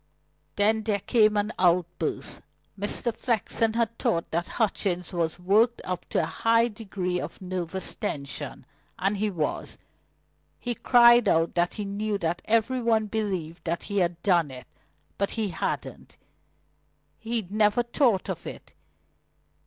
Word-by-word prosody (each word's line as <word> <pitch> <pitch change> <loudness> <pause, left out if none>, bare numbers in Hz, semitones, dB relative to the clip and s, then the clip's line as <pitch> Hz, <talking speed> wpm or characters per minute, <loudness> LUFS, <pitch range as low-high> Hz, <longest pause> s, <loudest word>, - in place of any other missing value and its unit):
Then 215 +2 +3
there 210 -2 +1
came 215 -2 +3
an 205 +2 0
outburst. 175 -1 0 0.3
Mr. 205 +3 0
Flexen 225 -1 0
had 230 0 -1
thought 170 0 0
that 170 +1 -1
Hutchings 190 -5 0
was 165 -2 -1
worked 215 +7 +3
up 180 -1 -4
to - - +1
a - - 0
high 230 +1 +2
degree 190 -5 -3
of - - -7
nervous 185 0 -2
tension, 140 -10 -5 0.3
and 195 +2 0
he 210 +1 0
was. 165 -6 -3 0.8
He 245 - -2
cried 240 +1 +6
out 165 +1 +2
that 175 0 0
he 210 - -4
knew 205 +1 -2
that 170 -1 -2
every 230 +3 +1
one 225 -2 +2
believed 190 -6 -3
that 170 0 -2
he 200 -1 -1
had 175 -2 0
done 175 -6 +3
it; 130 -1 -10 0.5
but 200 - +1
he 215 -2 0
hadn't. 170 - -4 1.0
He'd 225 -4 -3
never 215 +2 +3
thought 235 -4 +1
of - - -5
it. - - -9
205 Hz, 145 wpm, -26 LUFS, 180-225 Hz, 1.0 s, cried